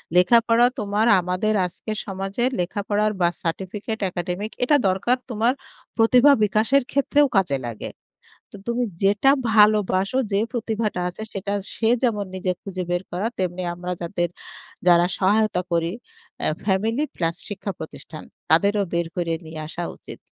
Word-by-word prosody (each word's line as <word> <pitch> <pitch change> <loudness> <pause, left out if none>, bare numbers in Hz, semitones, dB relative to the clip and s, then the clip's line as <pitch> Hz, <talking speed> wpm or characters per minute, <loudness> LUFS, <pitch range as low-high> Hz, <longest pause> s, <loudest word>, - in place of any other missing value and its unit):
লেখাপড়া 230 +5 +5
তোমার 210 +1 0
আমাদের 185 +4 0
আজকের 215 +4 -5
সমাজে 195 +3 -3 0.2
লেখাপড়ার 205 +4 0
বা 175 - +5
সার্টিফিকেট 195 +6 -4
একাডেমিক 180 +4 -4
এটা 295 +4 +4
দরকার 195 +7 +1
তোমার 235 +2 +1 0.4
প্রতিভা 250 +5 +6
বিকাশের 220 +6 +3
ক্ষেত্রেও 285 +1 +3
কাজে 175 -8 +2
লাগে। 115 -2 -6 0.6
তো - - -11
তুমি 235 +1 0 0.2
যেটা 205 +7 +4 0.2
ভালোবাসো, 210 0 +4
যে, 195 - +2
প্রতিভাটা 220 -4 -2
আছে" 180 - -10
সেটা 200 +1 -3 0.2
সে 225 - +1
যেমন 210 -5 +1
নিজে 185 0 -1
খুঁজে 185 -2 -5
বের 175 +1 0
করা 185 +5 -1
তেমনি 185 0 -2
আমরা 180 +1 -5
যাদের 175 0 -1 0.6
যারা 175 0 +6
সহায়তা 205 -1 +2
করি 170 0 +1 0.5
আ - - +2 0.2
ফ্যামিলি 220 +7 +1
প্লাস 165 -1 -1
শিক্ষা 205 0 -4
প্রতিষ্ঠান 155 0 -9 0.3
তাদেরও 200 +5 +4
বের 170 -1 0
করে 170 -2 -1
নিয়ে 160 0 -8
আসা 170 +2 -5
উচিত। - - -11
200 Hz, 140 wpm, -23 LUFS, 180-220 Hz, 0.6 s, প্রতিভা